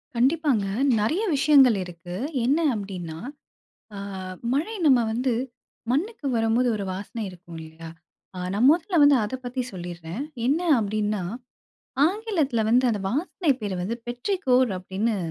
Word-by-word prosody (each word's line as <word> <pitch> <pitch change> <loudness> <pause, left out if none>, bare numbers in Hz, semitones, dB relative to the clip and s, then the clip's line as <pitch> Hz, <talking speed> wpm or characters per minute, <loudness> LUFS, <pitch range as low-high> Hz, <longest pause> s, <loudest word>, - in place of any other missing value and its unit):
கண்டிப்பாங்க. 265 -4 +2 0.3
நெறைய 310 - +1
விஷயங்கள் 270 -6 +5
இருக்கு. 175 0 -9 0.3
என்ன 280 +5 +3 0.2
அப்பிடின்னா, 185 -6 -5 0.8
ஆ - - -7 0.6
மழை 335 +11 -1
நம்ம 265 -4 +6
வந்து 245 +2 0 0.6
மண்ணுக்கு 335 - -2
வரம்போது 225 +2 +2
ஒரு 200 - -3
வாசனை 210 +4 -5
இருக்கும் 175 -2 -12
இல்லேங்களா! 160 +1 -10 0.5
அ 180 - -5
நான் 225 +6 +4
முதல்ல 340 +1 +1
வந்து 285 -1 +7
அத 215 +5 -3
பத்தி 250 +1 -2
சொல்லிர்றேன். 175 - -6 0.2
என்ன 295 +6 +2 0.2
அப்பிடின்னா 210 -1 -1 0.9
ஆங்கிலத்தில 350 - 0
வந்து 250 +2 +4
அந்த 210 -3 -2
வாசனை 315 +3 -1
பேரு 205 -3 -3
வந்து 225 +6 -2
பெற்றிகோர் 255 - +1
அப்பிடின்னு 200 +4 -2
235 Hz, 130 wpm, -25 LUFS, 195-285 Hz, 0.9 s, வந்து